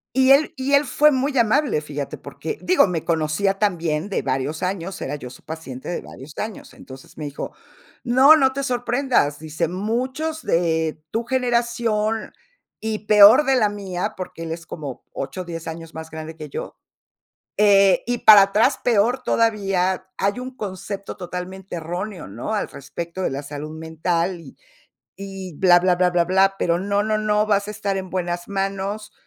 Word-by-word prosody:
Y 265 0 +4
él 280 +3 +5
y 265 +1 -2
él 280 +1 +5
fue 300 +4 +4
muy 270 +1 0
amable, 235 - +2
fíjate, 145 -1 -5
porque 440 - -6
digo, 370 -8 +4
me 175 -4 -3
conocía 165 +5 0
también 170 -4 0
de 200 - -1
varios 135 +4 -2
años, 185 0 -3
era 145 - -3
yo 130 -4 -8
su - - -14
paciente 155 -5 -8
de 175 - -2
varios 135 +3 -12
años. 215 -1 -6
Entonces, 130 +2 -13
me 155 - -5
dijo: 145 - -6 0.5
"No, 260 +5 +7
no 265 -3 +3
te 275 +1 -3
sorprendas", 245 - 0
dice, 160 +1 -3
"muchos 255 - -2
de 160 -2 0
tu 230 +1 -2
generación 235 -3 0 0.5
y 220 -1 -3
peor 210 +7 +8
de 270 -2 +3
la 215 -4 +3
mía", 195 -3 -4
porque 185 -2 -7
él 160 - -4
es 170 +1 -7
como 145 -6 -7
8, 180 +7 -5
10 165 -1 -7
años 165 0 -8
más 160 0 -8
grande 160 0 -8
que 155 -2 -8
yo, - - -7 0.8
eh, 200 -2 +5
"y 245 0 -1
para 210 -2 +9
atrás 200 +3 +2
peor 240 +2 +2
todavía, 195 -6 +1
hay 200 +5 0
un 255 0 -7
concepto 200 -2 -6
totalmente 180 +1 -6
erróneo, 175 - -5
¿no?, 115 - -5
al 210 - -1
respecto 170 +6 -7
de 185 - 0
la 140 +2 -4
salud 145 +1 -7
mental 165 +2 -1
y 155 -5 -13 0.6
y 195 -2 -7
bla, 180 -2 +6
bla, 180 0 +3
bla, 180 0 +2
bla, 190 +2 +3
pero 170 -1 +1
no, 200 +1 0
no, 215 0 0
no, 210 0 +1
vas 205 -1 +1
a - - -3
estar 200 -2 -2
en 190 -1 -5
buenas 175 -1 -3
manos. 195 +1 -3
195 Hz, 175 wpm, -22 LUFS, 165-220 Hz, 0.8 s, para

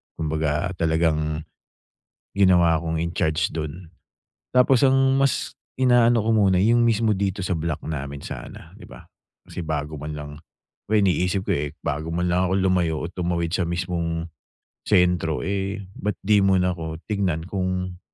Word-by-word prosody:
kumbaga 75 +1 -1
talagang 80 -1 0 0.9
ginawa 90 -4 +5
kong 80 0 -2
incharge 80 -1 0
dun. 80 +3 -5 0.6
Tapos 125 0 +4
ang 135 0 +4
mas 135 0 0 0.2
inaano 120 -2 +4
ko 110 +1 -1
muna 95 -4 +3
yung 115 +5 +4
mismo 115 -2 +2
dito 95 0 -2
sa 90 -1 -1
block 80 -2 -3
namin 70 -2 -5
sana, - - -9
di - - -14
ba. - - -13 0.4
Kasi 90 - -6
bago 75 -1 -3
man 75 +1 -6
lang, 75 -1 -7 0.6
iniisip 95 -1 +2
ko - - +1
eh, 75 0 -3
bago 80 +3 -3
man 90 +1 0
lang 90 +1 +2
akong 95 - +2
lumayo 90 -4 +1
o - - -3
tumawid 85 -1 -2
sa 95 - 0
mismong 85 -1 -2 0.6
sentro 90 -3 +2
eh 100 +2 -3
ba't 105 -2 -2
di 105 0 +4
muna 95 -2 +3
ko 80 -2 -5
tignan 95 -7 -1
kung 90 -1 -3
90 Hz, 150 wpm, -23 LUFS, 80-100 Hz, 0.9 s, ginawa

